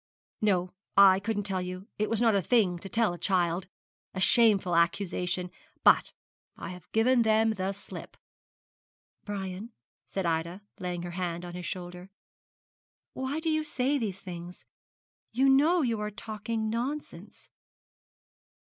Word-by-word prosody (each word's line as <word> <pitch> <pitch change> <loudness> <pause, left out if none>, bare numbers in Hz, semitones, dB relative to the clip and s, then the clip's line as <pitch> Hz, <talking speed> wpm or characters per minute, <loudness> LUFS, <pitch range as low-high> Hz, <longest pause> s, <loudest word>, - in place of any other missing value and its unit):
No, 185 -4 +1 0.2
I 195 -1 +8
couldn't 205 0 -2
tell 190 -2 -1
you; 185 +2 -6
it 215 - +1
was 225 - 0
not 230 -2 +4
a 200 - +3
thing 190 -5 +2
to 195 - -8
tell 225 -1 +1
a 175 - -8
child 180 -2 +1 0.5
a - - -2
shameful 200 -4 +4
accusation; 180 +1 0 0.3
but - - +5 0.5
I - - -6
have 180 -2 -11
given 240 +3 +4
them 220 0 +3
the 190 -2 -2
slip.' 200 +1 -10 1.1
'Brian,' 200 +2 -5 0.3
said 195 -2 -3
Ida, 170 +4 -1 0.2
laying 180 -1 -3
her 175 - -5
hand 175 -1 -3
on 175 - -8
his 180 0 -5
shoulder, 180 0 -6 1.0
'why 265 +4 -3
do 320 0 0
you 310 0 +1
say 280 -1 0
these 200 -5 -3
things? 175 -1 -9 0.7
You 265 +4 +3
know 300 +6 +5
you 230 -4 0
are 210 0 -2
talking 220 +1 -4
nonsense.' 250 +7 -5
200 Hz, 145 wpm, -29 LUFS, 180-230 Hz, 1.1 s, I